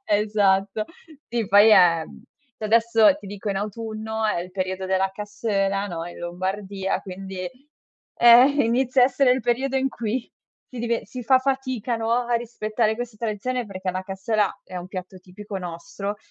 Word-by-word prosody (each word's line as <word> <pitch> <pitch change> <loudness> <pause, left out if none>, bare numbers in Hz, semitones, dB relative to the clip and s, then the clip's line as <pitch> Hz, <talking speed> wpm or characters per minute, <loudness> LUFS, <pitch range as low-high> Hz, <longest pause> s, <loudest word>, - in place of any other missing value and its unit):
Esatto. 205 -1 +2 0.5
Sì, 230 -3 -1
poi 205 +2 +7
è 175 -5 +6
mhmm, - - -14 0.4
cioè 215 - -6
adesso, 230 +3 +4
ti 200 - -12
dico, 205 +1 -6
in 195 - -2
autunno 220 +1 -4
è 190 -5 0
il 180 - -7
periodo 185 0 -3
della 190 0 +1
cassoeula, 205 -1 -1
no, 170 -3 -5
in 175 - -10
Lombardia, 190 +2 -3
quindi 190 0 -7 0.8
eh, 240 +1 +8 0.2
inizia 250 +2 +2
a - - +9
essere 260 -1 +3
il 255 - 0
periodo 260 +3 0
in 265 0 +1
cui 235 0 -3 0.4
ti 250 - -9
dive 235 0 -1
si 255 - -8
fa 260 +2 +5
fatica, 260 -3 -2
no, 225 0 -2
a 240 0 +1
rispettare 220 -1 -1
questa 240 -2 -6
tradizione, 235 +3 -2
perché 185 -2 -4
la 185 0 -3
cassoeula 195 +2 -1
è 185 - -9
un 180 +1 -6
piatto 185 0 -7
tipico 195 +2 -9
nostro 180 +3 -6
210 Hz, 170 wpm, -24 LUFS, 190-235 Hz, 0.8 s, a